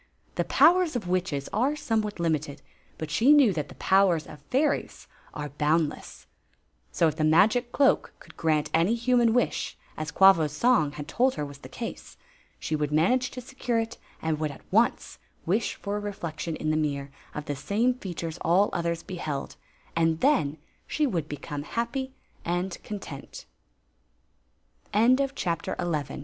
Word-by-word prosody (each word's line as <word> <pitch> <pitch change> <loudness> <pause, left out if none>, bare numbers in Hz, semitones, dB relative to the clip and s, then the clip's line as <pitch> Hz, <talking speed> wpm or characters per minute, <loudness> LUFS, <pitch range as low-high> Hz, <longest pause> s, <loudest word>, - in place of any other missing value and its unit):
The - - 0
powers 355 -4 +4
of 215 -7 -3
witches 175 -6 -1
are 260 +8 +1
somewhat 220 -8 -2
limited; 155 -4 -1 0.3
but 160 -1 -5
she 235 - +4
knew 275 -9 +6
that 150 -4 -3
the - - -12
powers 190 -5 +3
of 150 - -12
fairies 285 +3 0 0.3
are 150 -1 -5
boundless. 150 +2 -1 0.7
S.i 165 - +3
if 155 - -7
t}ie 155 -2 +2
magic 220 +10 +4
cloak 275 +1 +3
could - - -16
grant 155 -2 0
any 170 +8 +3
human 240 -1 +3
wi^ 245 +2 0 0.2
as 155 0 -3
Quavos 170 -4 +5
song 200 - +3
had 150 -1 -7
told 255 +9 +2
her 150 - -2
was 140 -1 -10
the - - -11
case, - - -7 0.4
she 155 - -2
would 150 -1 -1
manage 245 +12 +2
to 255 - -7
secure 250 -2 -3
it 225 +1 -3 0.2
and 160 -1 0
would 155 -1 -1
at 140 - -12
once - - +1 0.3
wish 205 +7 0
for 200 +1 -4
a - - -2
reflection 170 -5 -4
in 155 0 -1
the - - +1
mirror 140 -2 -2 0.2
of 150 - -4
the 145 - -3
same 205 - +1
features 175 -8 -6
all 185 +5 +3
others 170 -1 -1
beheld 155 -6 -5 0.2
— - - -31
and 165 -1 +2
then 250 - +2 0.3
she 305 - +1
would 170 - -2
170 Hz, 150 wpm, -27 LUFS, 155-235 Hz, 0.7 s, knew